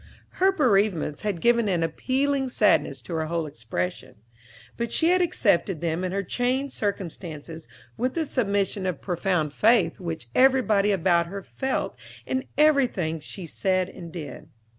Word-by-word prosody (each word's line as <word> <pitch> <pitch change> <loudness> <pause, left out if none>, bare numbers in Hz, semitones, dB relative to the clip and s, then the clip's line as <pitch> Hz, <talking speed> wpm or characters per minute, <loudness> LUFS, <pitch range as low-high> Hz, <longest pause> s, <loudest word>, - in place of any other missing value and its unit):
Her 380 +1 +5
bereavements 205 - +1
had 200 -6 -2
given 235 -2 +3
an 175 -3 +1
appealing 265 - 0
sadness - - +2
to 175 - -7
her 160 -1 -1
whole 165 0 -1
expression; 115 -10 -5 0.6
but 235 -1 -3
she 325 - +2
had 365 +1 +4
accepted 200 - +1
them 170 +2 -2
and 185 - -2
her 200 +1 -1
changed 255 +7 -1
circumstances 165 - -5 0.3
with 255 +2 -1
the 325 -1 0
submission 200 -7 0
of 180 -5 -2
profound 175 -4 -1
faith 210 -5 +3
which 165 -7 -5
everybody 240 -6 +4
about 175 -3 +2
her 195 +2 -6
felt 265 +6 -3 0.3
in 260 +1 -2
everything 250 - +3
she 175 +4 -8
said 185 +2 0
and 170 -3 -10
did. 155 -6 -8
195 Hz, 150 wpm, -25 LUFS, 165-250 Hz, 0.6 s, Her